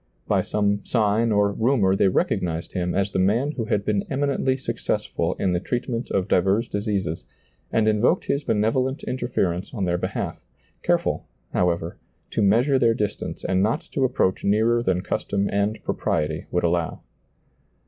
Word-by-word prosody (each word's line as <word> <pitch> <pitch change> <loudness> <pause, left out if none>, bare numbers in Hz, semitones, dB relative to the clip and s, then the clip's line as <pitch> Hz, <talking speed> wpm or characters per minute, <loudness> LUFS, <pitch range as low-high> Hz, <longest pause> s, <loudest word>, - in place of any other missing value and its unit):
By - - +3
some 100 -1 0
sign 110 0 +2
or 100 -1 +3
rumor 110 -4 +2
they 100 - +3
rec 95 - +2
ognized 85 -1 -2
Him 90 -1 -1
as 100 +1 +1
the - - -1
man 115 +10 +2
who 120 -7 -3
had 105 -3 0
been 105 -2 +1
eminently 135 -1 0
successful 130 - -2
in 95 -2 0
the 90 - +1
treatment 120 +3 -3
of 95 -1 0
divers 95 +5 +2
diseases, 100 -6 -2 0.4
and 110 -1 +2
invoked 110 - +2
His 140 +1 0
benevolent 125 +4 0
interference 100 -7 -2
on 100 -4 -1
their 90 0 0
behalf, - - -4 0.4
careful, - - 0 0.3
however, 85 -1 0 0.3
to - - 0
measure 120 +7 +4
their 115 -3 +3
distance 105 -1 -3
and 95 0 +2
not 110 - +1
to 135 - 0
approach 125 -7 +1
nearer 110 +4 +3
than 95 -5 +1
custom 100 +1 -1
and 100 +2 0
propriety 80 0 -1
would 90 - 0
allow. 85 -1 0
105 Hz, 160 wpm, -24 LUFS, 95-120 Hz, 0.4 s, measure